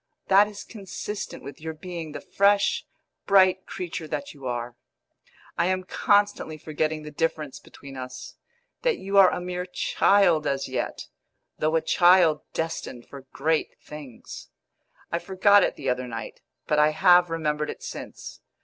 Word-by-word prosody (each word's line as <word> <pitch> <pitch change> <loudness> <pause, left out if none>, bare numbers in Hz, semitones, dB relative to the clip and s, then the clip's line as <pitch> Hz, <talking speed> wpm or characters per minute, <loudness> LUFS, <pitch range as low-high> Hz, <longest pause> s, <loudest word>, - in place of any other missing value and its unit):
That 200 +2 +6
is 205 -1 -9
consistent 205 0 -7
with 140 +2 -10
your 160 0 -5
being 170 -1 -7
the - - -6
fresh, 200 0 +2 0.4
bright 190 -1 +4
creature 170 -3 -5
that 280 - -4
you 135 -3 -8
are. 120 0 -4 0.8
I 170 - +3
am 185 0 0
constantly 205 -4 +1
forgetting 155 0 -2
the 150 - -8
difference 155 -2 -2
between 140 -1 -13
us 130 -1 -8 0.5
that - - +1
you 195 +1 +2
are 190 -2 +8
a - - -3
mere 180 0 -4
child 180 -4 +3
as 135 0 -1
yet, - - -4 0.5
though 155 +1 +1
a 165 - +3
child 175 -4 +5
destined 160 -7 -4
for 135 -1 -12
great 155 +2 -1
things. 150 -5 -10 0.6
I 170 - 0
forgot 195 +3 +4
it - - 0
the 135 - -3
other 125 0 -1
night, 115 -2 -7 0.2
but 150 - +1
I 150 0 +5
have 175 +2 +5
remembered 150 -2 -1
it - - -7
since. - - -8
165 Hz, 155 wpm, -25 LUFS, 150-185 Hz, 0.8 s, are